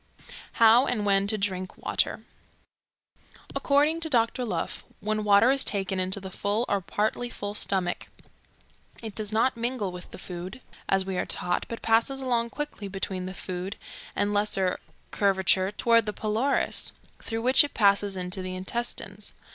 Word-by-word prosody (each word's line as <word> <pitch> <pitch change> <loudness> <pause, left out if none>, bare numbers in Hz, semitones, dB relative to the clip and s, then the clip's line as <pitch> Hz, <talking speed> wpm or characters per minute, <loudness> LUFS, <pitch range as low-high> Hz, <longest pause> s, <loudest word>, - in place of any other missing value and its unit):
How 230 +3 +6
and 215 -4 -1
When 200 0 +3
to 215 +1 +2
Drink 185 -2 -3
Water. - - 0 1.3
According 295 +3 +2
to 325 -1 +2
Doctor 235 -1 +2
Leuf, 235 - -3 0.2
when 215 0 -1
water 210 +4 +5
is 275 0 +5
taken 195 -2 0
into 185 +2 0
the 190 -1 -8
full 205 +5 -1
or 200 -1 0
partly 215 +6 -1
full 205 -3 -6
stomach, 190 -4 0 1.0
it 220 -2 -6
does 215 0 -3
not 230 +4 +2
mingle 235 -4 -2
with 180 0 -10
the - - -10
food, 180 +3 -7 0.3
as 195 -1 +2
we 190 -1 -2
are - - -2
taught, 175 0 +1
but 230 - -6
passes 230 +4 +2
along 240 -3 0
quickly 295 -7 -5
between 190 -1 -4
the 185 - -7
food 185 +3 -5 0.4
and 205 0 0
lesser 205 -3 +1 0.3
curvature 190 -1 +2
toward 230 +1 +3
the 210 - -1
pylorus, 225 +7 0 0.3
through 225 0 -4
which 260 +3 +7
it 290 - -6
passes 200 -2 +3
into 180 +1 -2
the 185 0 -5
intestines. 200 0 -3
205 Hz, 160 wpm, -27 LUFS, 190-230 Hz, 1.3 s, which